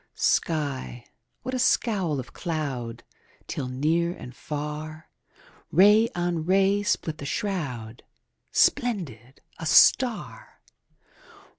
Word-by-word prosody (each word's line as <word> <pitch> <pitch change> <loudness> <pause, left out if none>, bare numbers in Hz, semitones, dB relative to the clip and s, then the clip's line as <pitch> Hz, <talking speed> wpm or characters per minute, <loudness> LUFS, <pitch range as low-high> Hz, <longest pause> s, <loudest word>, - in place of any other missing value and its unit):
Sky 140 -6 -1 0.4
what 255 - -4
a 255 - -1
scowl 195 - +1
of 125 - -8
cloud 130 -8 -4 0.4
5 - - -31
Till, 130 - -4
near 160 +7 0
and 125 0 -10
far, 150 +1 -6 0.6
Ray 210 +6 +6
on 175 -2 -1
ray 195 +3 +3
split 160 -5 -1
the 140 - -6
shroud: 135 - -4 0.5
Splendid, 155 - 0 0.2
a 160 - -4
star! 255 - +3
155 Hz, 105 wpm, -26 LUFS, 135-195 Hz, 0.6 s, Ray